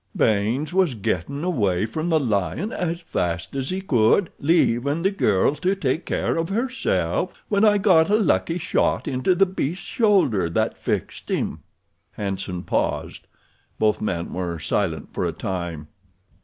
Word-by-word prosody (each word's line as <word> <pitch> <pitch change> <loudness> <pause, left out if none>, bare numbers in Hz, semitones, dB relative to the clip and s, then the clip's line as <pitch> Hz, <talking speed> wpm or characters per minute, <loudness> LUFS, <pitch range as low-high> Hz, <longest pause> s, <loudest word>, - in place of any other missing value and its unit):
Baynes 115 +9 +1
was 185 -8 +2
gettin' 110 - -2
away 105 - +1
from 155 +9 -3
the 160 -2 +3
lion 115 - -1
as 170 -1 -2
fast 85 - -3
as 135 0 -2
he 185 +1 -2
could, 145 - +3
leavin' 145 -1 +2
the 195 - +3
girl 105 - +2
to 180 +7 0
take 160 -2 -1
care - - 0
of 165 +1 -1
herself, 240 +6 -1
when 205 0 +2
I 210 -1 +5
got 185 -5 +4
a 210 - +4
lucky 185 -5 +1
shot 170 - 0
into 135 +7 +1
the 195 - +5
beast's 180 -2 -3
shoulder 185 - +2
that 85 - 0
fixed - - -3
him." - - -1 0.5
Hanson 95 -3 -4
paused. - - -2 0.5
Both 110 -1 +1
men 85 -5 -2
were 90 -2 -3
silent 80 +1 -2
for - - -2
a - - 0
time. 85 -5 -4
140 Hz, 155 wpm, -23 LUFS, -, 0.5 s, I